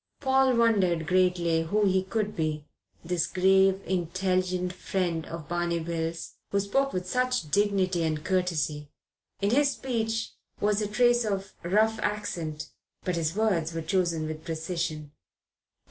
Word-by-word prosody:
Paul 265 -2 +3
wondered 190 -8 +3
greatly 180 -2 +2
who 205 +6 +1
he 190 -1 +3
could 210 +2 -2
be, 155 -2 -2 0.4
this 175 -1 0
grave, 190 +1 +3
intelligent 185 0 -1
friend 175 -4 -2
of 165 -3 -7
Barney 175 0 -1
Bill's, 165 0 -4
who 200 - +1
spoke 270 +8 +1
with 180 0 -3
such 250 -8 0
dignity 195 -3 +2
and 155 -1 -1
courtesy. 165 -6 -1 0.5
In 200 +1 +2
his 280 +3 +4
speech 225 -3 -2 0.3
was 210 0 +1
a 210 - -1
trace 240 +3 +3
of 195 -2 -3
rough 215 +5 +2
accent; 170 -7 -3 0.3
but 180 - -1
his 165 0 -1
words 175 -7 +1
were 165 - -2
chosen 170 -4 0
with 155 0 -6
precision. 160 -2 -3
185 Hz, 140 wpm, -27 LUFS, 165-210 Hz, 0.5 s, his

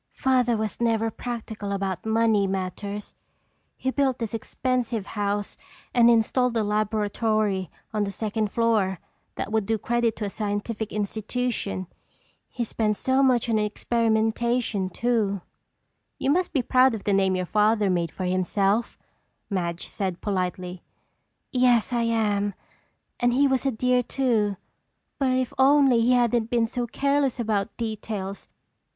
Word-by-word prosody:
"Father 250 -3 +2
was 215 +1 -3
never 225 -1 +1
practical 220 -4 -5
about 195 0 -3
money 220 -2 +3
matters. 195 +2 -4 0.6
He 260 - -1
built 270 -2 +1
this 230 -2 -4
expensive 240 -2 -2
house 205 -1 -2 0.4
and 235 -1 +6
installed 235 +1 +2
a 220 - +2
laboratory 210 -2 0 0.2
on 210 -1 +1
the 200 - -4
second 215 0 -2
floor 215 -5 +1 0.4
that - - -4
would 220 -3 0
do 225 0 +1
credit 235 0 0
to 210 - -4
a - - -2
scientific 210 +1 -3
institution. 210 -1 -2 0.6
He 245 - -3
spent 215 -2 -1
so 260 +1 +2
much 255 -3 +3
on 225 -2 +2
experimentation 225 -1 0
too." 210 -2 0 0.8
"You 275 - +1
must 360 +4 +1
be 265 - +1
proud 255 -1 +4
of 210 - -7
the 205 - +1
name 190 -1 +3
your 185 0 -1
father 210 +2 +2
made 175 -3 +1
for 185 - -5
himself," 195 +4 +1 0.5
Madge 170 -3 -2
said 190 -4 -3
politely. 180 -2 -3 0.7
"Yes, 250 -2 +3
I 235 -1 +1
am, 205 -3 0 0.6
and 245 0 +2
he 280 +3 +4
was 265 0 +1
a - - +2
dear, 250 +2 +2
too. 230 -6 0 0.6
But 270 -2 +2
if 255 -1 0
only 270 -3 +5
he 245 +2 +4
hadn't 240 -2 +2
been 235 -1 +2
so 240 +1 -3
careless 280 0 0
about 215 -2 -1
details! 215 -3 -4
220 Hz, 145 wpm, -25 LUFS, 200-240 Hz, 0.8 s, and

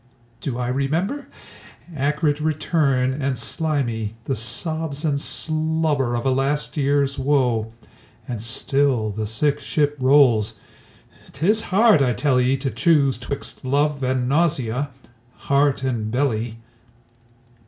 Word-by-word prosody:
Do 120 0 -4
I 125 -1 -2
remember? 165 - -1 0.7
Acrid 150 +1 0
return 145 -4 +1
and 135 -2 -2
slimy, 120 -4 -1
The 135 - -1
sobs 155 +5 -2
and 140 -2 0
slobber 155 -6 0
of 120 - -3
a 135 - +3
last 135 +3 -1
years 140 -1 +1
woe. 125 -5 +1 0.6
And 120 -4 -4
still 120 0 0
the 105 +1 -4
sick 140 +7 0
ship 145 -3 0
rolls. 130 -5 +4 0.8
'Tis 200 +11 +2
hard, 210 -3 +5
I 125 -2 +2
tell 130 +3 +2
ye, 130 +2 +2
To 135 0 -3
choose 140 +1 +2
'twixt 135 +3 -5
love 140 +2 0
and 130 -1 0
nausea, 140 -3 0 0.5
heart 140 -1 +1
and 120 -5 -2
belly. 115 -3 -1
140 Hz, 120 wpm, -22 LUFS, 125-150 Hz, 0.8 s, hard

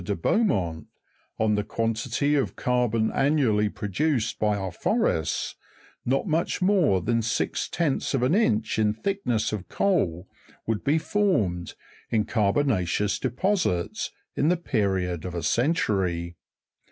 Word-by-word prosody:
de 100 +3 -2
Beaumont, 85 - 0 0.5
on 110 -1 +2
the 105 0 +1
quantity 115 +6 -1
of 140 -3 0
carbon 120 -3 +1
annually 130 -8 +2
produced 110 - -1
by 105 -1 +1
our 95 -2 -3
forests, 80 -1 0 0.5
not 135 +2 +1
much 165 -2 0
more 180 - +3
than 115 +2 +1
six 115 - -1
tenths 155 -4 0
of 125 - 0
in 130 +5 +2
inch 110 - +1
in 105 -1 +2
thickness 125 - -1
of 100 -3 -5
coal 95 - 0 0.4
would 110 -2 -2
be 145 +3 +2
formed, 115 - 0 0.3
in 110 -2 +1
carbo 105 +4 +2
na'ceous 100 - 0
deposits, 130 - 0 0.3
in 150 - +2
the 180 - +3
period 95 - -1
of 90 -1 -5
a 85 - -3
century. 95 - 0
110 Hz, 135 wpm, -26 LUFS, 95-145 Hz, 0.5 s, more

